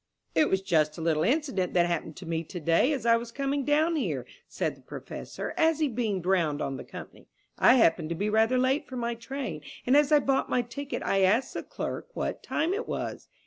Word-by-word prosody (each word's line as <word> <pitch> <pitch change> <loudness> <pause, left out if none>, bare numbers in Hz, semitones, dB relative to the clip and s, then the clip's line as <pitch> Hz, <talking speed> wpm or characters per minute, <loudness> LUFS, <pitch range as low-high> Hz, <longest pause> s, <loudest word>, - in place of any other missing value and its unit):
"It 310 - +3
was 190 0 +1
just 155 -5 +1
a - - -6
little 160 -2 +1
incident 250 - 0
that 175 -1 +5
happened 165 -2 -2
to 185 - -9
me 165 0 -2
to 175 - -7
day 165 - +3
as 275 -5 -2
I 230 0 +5
was 230 0 -7
coming 275 +2 -1
down 310 +4 +2
here," 160 - -2 0.2
said - - -2
the - - -20
Professor, - - -7
as 320 -1 +3
he 310 -1 +2
beamed 220 -8 -2
round 170 -6 +2
on 135 -3 -3
the - - -7
company. - - -11 0.3
"I 250 - +7
happened 165 -9 +3
to 170 - -2
be 205 +5 -1
rather 220 +4 +3
late 260 +3 +1
for 260 - -8
my 235 0 -1
train, 235 - -5 0.2
and 255 - +4
as 295 0 +4
I 300 - +8
bought 270 -1 +1
my 250 - +1
ticket 270 +4 -5
I 195 - +1
asked 210 +7 +2
the - - -3
clerk - - -5
what - - -3
time 325 +5 -1
it 450 +4 -3
was. - - -4
230 Hz, 225 wpm, -28 LUFS, 170-275 Hz, 0.3 s, I